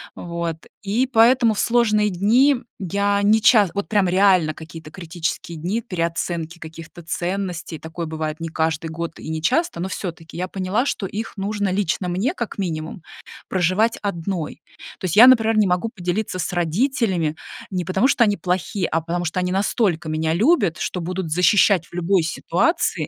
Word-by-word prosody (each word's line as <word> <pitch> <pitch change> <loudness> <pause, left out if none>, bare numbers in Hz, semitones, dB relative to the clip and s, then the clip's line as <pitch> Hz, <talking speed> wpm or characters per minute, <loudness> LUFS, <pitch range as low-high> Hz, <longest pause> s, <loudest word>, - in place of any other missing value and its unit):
Вот, 170 -1 -4 0.3
и 215 +6 0
поэтому 235 -1 +4
в 205 - -4
сложные 215 -3 +2
дни, 225 +10 +4
м, 250 -2 -6
я 200 +2 0
не 215 +2 +4
ча 215 -6 +6
вот 200 - -2
прям 205 -4 +2
реально 185 -4 +3
какие-то 160 -1 -10
критические 170 -1 -5
дни 200 +8 -2
переоценки 170 -3 -3
каких-то 160 +1 -11
ценностей, 180 -1 -3
такое 160 +1 -6
бывает 155 0 -4
не 165 - -4
каждый 160 0 -1
год 165 +1 -6
и - - -8
не 160 0 -4
часто, 255 - +1
но 185 - -2
всё-таки 170 -4 -7
я 180 +2 -3
поняла, 195 +8 -1
что 195 - -2
их 215 +4 -5
нужно 205 0 -1
лично 185 -1 -1
мне, 205 - 0
как 235 - -5
минимум, 160 -3 -4 0.5
проживать 190 +5 +1
одной. 180 -4 -4 0.4
То - - -5
есть 175 - -1
я, 235 +4 +9
например, 225 -3 +5
не 210 -2 +4
могу 180 +5 0
поделиться 185 -1 -3
с 160 - -2
родителями 180 - 0 0.3
не 180 -3 -3
потому, 190 +8 +2
что 245 - +3
они 205 -2 +2
плохие, 180 +1 -1
а 165 - -1
потому 175 +2 -3
что 170 +2 -2
они 180 - -1
настолько 190 -4 0
меня 160 +1 0
любят, 200 - +2
что 180 - -3
будут 180 0 -4
защищать 180 0 +4
в - - -25
любой 175 0 +1
ситуации. 190 - 0
185 Hz, 175 wpm, -21 LUFS, 165-210 Hz, 0.5 s, я